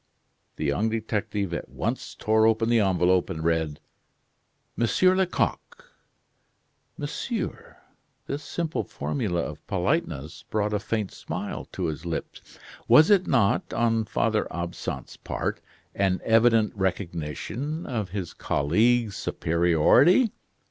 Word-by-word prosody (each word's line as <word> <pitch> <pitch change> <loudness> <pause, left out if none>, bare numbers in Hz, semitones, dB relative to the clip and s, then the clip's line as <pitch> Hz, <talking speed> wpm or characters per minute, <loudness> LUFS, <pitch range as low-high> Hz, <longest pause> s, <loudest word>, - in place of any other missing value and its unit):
The 80 - -3
young 75 +11 +1
detective 105 -4 -2
at - - -4
once - - -3
tore 110 0 +3
open 115 +1 +2
the 120 -1 +4
envelope 90 -2 +2
and 80 -4 -4
read: 80 -3 0 1.0
"Monsieur 150 - +3
Lecoq 190 - -2 0.5
" - - -45
"Monsieur?" 190 - -4 0.5
This 140 +1 -4
simple 160 +2 -2
formula 100 -11 -2
of - - -7
politeness 90 - -1
brought 105 0 0
a 105 - +1
faint 105 -1 -2
smile - - -5
to - - -4
his 80 +1 -3
lips. 85 -2 -6 0.3
Was 155 +6 +7
it 195 -3 +4
not, 120 -3 +2
on 115 -1 +2
Father 110 0 0
Absinthe's 85 -6 -5
part, - - -3 0.3
an 95 -2 +1
evident 115 -1 +4
recognition 95 - -3
of 110 -7 -3
his 95 -2 -5
colleague's 110 +8 +1
superiority. 85 - +3
105 Hz, 120 wpm, -26 LUFS, 85-120 Hz, 1.0 s, Was